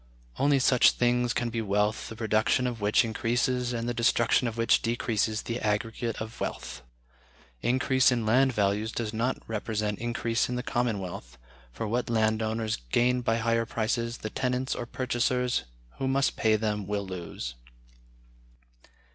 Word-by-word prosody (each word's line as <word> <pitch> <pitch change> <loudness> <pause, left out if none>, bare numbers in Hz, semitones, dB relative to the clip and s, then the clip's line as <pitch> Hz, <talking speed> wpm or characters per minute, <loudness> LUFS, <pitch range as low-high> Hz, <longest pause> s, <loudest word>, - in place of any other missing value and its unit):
Only 140 0 +4
such 130 -1 +5
things 120 0 +1
can 120 -1 -1
be 115 0 -2
wealth 105 +1 0
the 110 - -7
production 110 +3 +1
of 120 -3 -3
which 105 +3 +3
increases 120 +2 0
and 115 -1 -3
the 120 - -1
destruction 115 +1 +2
of 115 0 -4
which 115 0 +3
decreases 110 -2 0
the 115 +1 -3
aggregate 115 +2 -2
of 110 +1 -7
wealth.... - - -5 0.8
Increase 130 +1 +3
in 120 -3 0
land 130 +5 +4
values 105 0 0
does 110 -2 -3
not 115 +4 0
represent 105 -1 -2
increase 115 0 -1
in 125 - -2
the 125 - -3
common 120 -4 0
wealth, 85 -10 -7 0.3
for 110 - -4
what 120 +3 -1
land 110 -1 +2
owners 110 0 -1
gain 125 +1 +3
by 115 -2 +1
higher 115 0 +1
prices 115 +1 -1
the 110 - -6
tenants 130 0 -1
or 120 - -5
purchasers 125 - 0 0.3
who 135 - -1
must 135 +1 +1
pay 110 -1 +3
them 105 -2 -2
will 100 -1 -2
lose." 85 -9 -6
115 Hz, 160 wpm, -28 LUFS, 110-125 Hz, 0.8 s, such